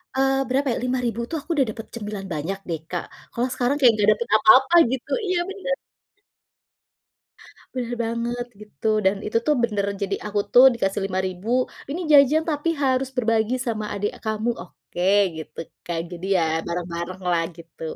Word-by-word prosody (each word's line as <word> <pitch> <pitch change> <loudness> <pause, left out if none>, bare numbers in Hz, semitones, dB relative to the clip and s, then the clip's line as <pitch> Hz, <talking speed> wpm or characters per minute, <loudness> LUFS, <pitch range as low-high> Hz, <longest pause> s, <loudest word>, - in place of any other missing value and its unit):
eee, 270 0 +2
berapa 275 +2 +1
ya, - - -3
5000 250 -2 -1
tuh 325 - -2
aku - - -26
udah 275 -3 +3
dapet 225 +1 -8
cemilan 210 -3 -5
banyak 165 +6 -3
deh, 165 -2 -2
Kak, 175 - -2 0.3
kalau 240 +2 -1
sekarang 255 +3 0
kayak 250 -5 +6
ga 205 - +3
dapet 215 +2 -1
apa-apa 260 +9 +6 0.2
gitu, 260 -2 -4 0.2
iya 365 -1 +1
bener. 405 +6 -2 2.0
Bener 245 -2 -3
banget 235 +1 -2 0.2
gitu, 210 -3 -6 0.2
dan 190 +1 +4
itu 215 - 0
tuh 300 - +5
bener, 210 -4 0 0.2
jadi 200 0 0
aku 210 0 -1
tuh 250 - +9
dikasih 200 -3 -1
5000 190 +1 -3 0.4
ini 305 +5 -3
jajan 290 +2 +6
tapi 295 +1 -1
harus 260 0 +1
berbagi 225 -1 +1
sama 215 -2 -2
adek 205 0 -2
kamu, 220 +2 -1
oke 175 - -10 0.4
gitu 160 - -9 0.3
kan, 170 -1 -2
jadi 175 +1 -7
ya 170 - +2 0.2
bareng-bareng 170 +1 -4
lah 170 -1 +2 0.2
gitu. 165 -1 -15
225 Hz, 165 wpm, -23 LUFS, 195-260 Hz, 2.0 s, tuh